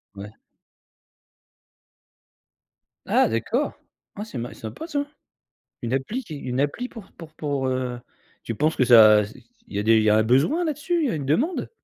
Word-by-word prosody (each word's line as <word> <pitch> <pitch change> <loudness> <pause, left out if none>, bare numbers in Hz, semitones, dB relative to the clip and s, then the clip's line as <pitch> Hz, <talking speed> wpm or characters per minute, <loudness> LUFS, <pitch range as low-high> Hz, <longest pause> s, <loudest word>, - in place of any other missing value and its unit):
Ouais. 100 +1 -9 2.7
Ah - - +3
d'accord, 220 - -1 0.4
ah, 210 - -5
c'est 180 - -8
ma 120 +1 -4
c'est - - -17
sympa, 115 - -7
ça. 285 -3 -2 0.8
Une 120 +1 -3
appli 210 - -2
qui 160 - -8
une 130 -1 -3
appli 190 - -2
pour 225 -6 -12
pour 160 -2 -12
pour, 140 -4 -2
heu, 130 -1 -2 0.4
tu 115 - -4
penses 155 +7 0
que 130 - +3
ça, 110 -3 +7
c'est 105 - -13 0.3
il - - -7
y - - 0
a - - 0
des 115 +1 +5
il - - +2
y 110 - +3
a 105 - +5
un 110 - +4
besoin 140 - +2
là-dessus, 320 +2 -1
il - - +2
y - - 0
a - - -2
une 145 -4 -4
demande? 260 - 0
135 Hz, 195 wpm, -24 LUFS, -, 2.7 s, ça